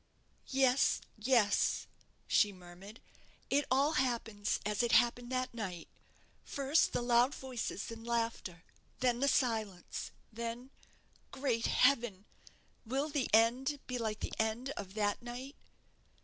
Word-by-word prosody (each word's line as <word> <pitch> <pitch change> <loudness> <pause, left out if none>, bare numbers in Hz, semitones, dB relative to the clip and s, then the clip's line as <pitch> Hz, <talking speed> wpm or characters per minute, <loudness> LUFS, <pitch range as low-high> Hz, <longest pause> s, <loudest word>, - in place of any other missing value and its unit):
"Yes, 265 0 +3 0.2
yes," 220 -2 +2 0.4
she 210 - +3
murmured; 185 +4 -12 0.5
"it 285 +1 +3
all 275 +4 +3
happens 235 -7 0
as 210 +1 0
it 240 -1 +1
happened 240 +1 +3
that 255 -1 -1
night 190 -7 -5 0.6
first 280 +3 +2
the - - -1
loud 240 +3 +3
voices 245 -5 -4
and 225 0 -8
laughter; 230 -7 -2 0.4
then 245 -2 +2
the 280 - +2
silence; 220 -9 -1 0.2
then 235 +3 -5 0.6
Great 245 -4 -1
Heaven! 240 -7 +2 0.6
will 270 +6 -1
the 285 -3 -1
end 250 +6 +3
be 250 -1 -3
like 215 -2 -3
the - - -4
end 220 +4 -1
of 195 -5 -7
that 205 -1 0
night?" 250 +4 -7
235 Hz, 125 wpm, -34 LUFS, 215-260 Hz, 0.6 s, Yes